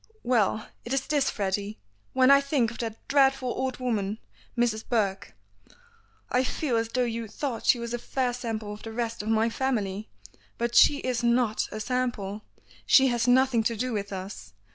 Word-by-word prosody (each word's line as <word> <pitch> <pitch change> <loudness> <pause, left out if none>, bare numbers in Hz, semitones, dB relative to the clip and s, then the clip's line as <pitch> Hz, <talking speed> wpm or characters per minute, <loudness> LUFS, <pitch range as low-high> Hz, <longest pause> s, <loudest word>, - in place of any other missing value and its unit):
"Well, 220 -3 +1 0.2
it 240 - -4
is 270 0 0
this, 290 -3 +1
Freddy. 200 +1 -2 0.4
When 260 +1 +5
I 280 0 +7
think 275 -5 +1
of 235 - -11
that 225 -2 -6
dreadful 270 -2 +3
old 260 +1 -2
woman, 220 -5 -1 0.4
Mrs. 230 -2 +1
Burke, 200 - -1 1.0
I 250 +1 +3
feel 260 -1 -1
as 225 0 0
though 250 +2 0
you 230 -1 -3
thought 240 +2 -4
she - - +6
was 235 0 -5
a 240 - -2
fair 250 0 -1
sample 225 -4 -4
of 210 - -11
the 225 - -7
rest 230 -1 -3
of 210 - -5
my 225 0 +3
family. 215 -5 -2 0.5
But 235 0 -1
she 285 +3 +6
is 245 -2 -1
not 235 -2 +1
a 215 - -5
sample, 225 -4 -2 0.5
she 265 -1 +6
has 240 -1 0
nothing 255 -1 +4
to 230 +1 0
do 250 +2 -2
with 205 -1 -3
us. 190 - -7
235 Hz, 185 wpm, -27 LUFS, 215-255 Hz, 1.0 s, I